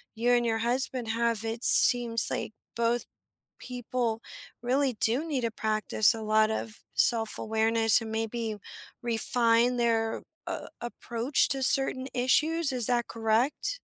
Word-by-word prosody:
you 235 +2 0
and 240 -1 +2
your 225 -1 0
husband 245 0 -2
have, 230 -1 -1
it 225 +2 -5
seems 235 -2 +4
like - - -4 0.2
both 235 +1 -1 0.5
people 245 -2 -4 0.4
really 260 +2 0
do 245 +8 0
need 285 -5 -2
to 230 -1 -2
practice 215 0 +1
a 225 - -7
lot 215 0 +2
of 220 0 -6
self-awareness 225 -1 +2
and 220 -1 -7
maybe 225 0 -4 0.4
refine 235 +1 +2
their 225 -2 0 0.2
a 335 -3 -6
approach 240 +2 -1
to 270 -1 +1
certain 265 0 +2
issues, 305 +5 +1
is 245 -3 +3
that 240 -1 0
correct? 230 - -1
235 Hz, 135 wpm, -27 LUFS, 225-250 Hz, 0.5 s, seems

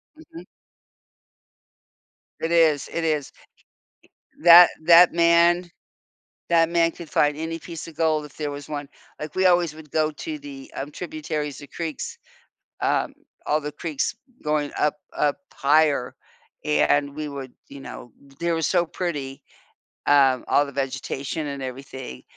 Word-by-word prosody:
Mhm. 330 +1 -12 2.0
It 165 - -2
is, 160 -4 +3
it 170 - -2
is 150 -3 -1 1.1
that 175 +1 +9
that 170 +1 +7
man 170 +1 +4 0.8
that 165 -1 +4
man 165 -1 +2
could 170 -2 -11
find 145 0 +2
any 165 +1 -4
piece 165 -1 -8
of 160 - -12
gold 155 -2 +1
if 145 - -15
there 150 -2 -2
was 145 -1 -7
one, 145 -1 -5 0.3
like, 150 -1 -7
we 190 0 +2
always 175 -3 +3
would 155 -2 -13
go 155 -1 +2
to 305 - -6
the, 280 0 -10
um, 140 +2 -5
tributaries, 150 -4 -5
the 145 - -11
creeks, 160 -2 -5 0.6
um, - - 0 0.3
all 150 +1 +2
the 150 0 -6
creeks 155 +5 -3 0.3
going 150 -1 -1
up 150 0 +2 0.2
up 145 -1 +2 0.2
higher, 145 -3 +2 0.5
and 140 - +2
we 155 0 -5
would, 135 -3 -7 0.2
you 140 -1 -11
know, 120 - -10 0.3
they 170 0 0
were 165 - -1
so 175 +2 +2
pretty, 145 -7 -5 0.6
um, 135 -3 +4
all 145 - +3
the - - -8
vegetation 135 +2 -3
and 140 -1 -5
everything, 130 - -8
155 Hz, 145 wpm, -24 LUFS, 140-170 Hz, 2.0 s, that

